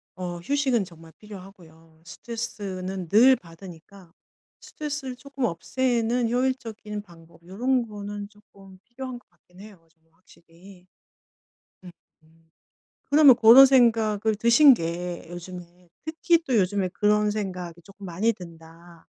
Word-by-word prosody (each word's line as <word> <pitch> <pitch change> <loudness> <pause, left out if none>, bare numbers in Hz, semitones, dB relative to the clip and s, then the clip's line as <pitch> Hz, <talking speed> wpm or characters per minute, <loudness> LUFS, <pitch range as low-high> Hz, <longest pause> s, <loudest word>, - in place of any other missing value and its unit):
어 175 -1 -6
휴식은 260 +1 0
정말 165 -2 -16
필요하고요. 175 -6 -15
스트레스는 190 -3 -6
늘 245 +7 +6
받으니까 175 0 -15 0.5
스트레스를 290 -4 -6
쪼끔 270 0 -5
없애는 235 +4 -1
효율적인 235 -5 -3
방법 165 -3 -19
요런 240 +6 -1
거는 205 -1 -8
쪼끔 195 -3 -19
필요한 245 +2 -8
것 - - -35
같긴 180 +1 -24
해요 195 -6 -16
좀 160 -1 -41
확실히. 180 +2 -20 1.0
음음. 165 -2 -20 0.6
그러면 285 -3 +7
고런 235 +4 +8
생각을 225 -4 +2
드신 235 +5 +6
게 175 -2 -5
요즘에 175 0 -11 0.2
특히 330 +2 +1
또 260 - -2
요즘에 195 -1 0
그런 210 +2 +1
생각이 180 -5 -6
쪼끔 195 +2 -15
많이 190 +7 0
든다 170 -2 -15
200 Hz, 275 characters per minute, -24 LUFS, 175-235 Hz, 1.0 s, 고런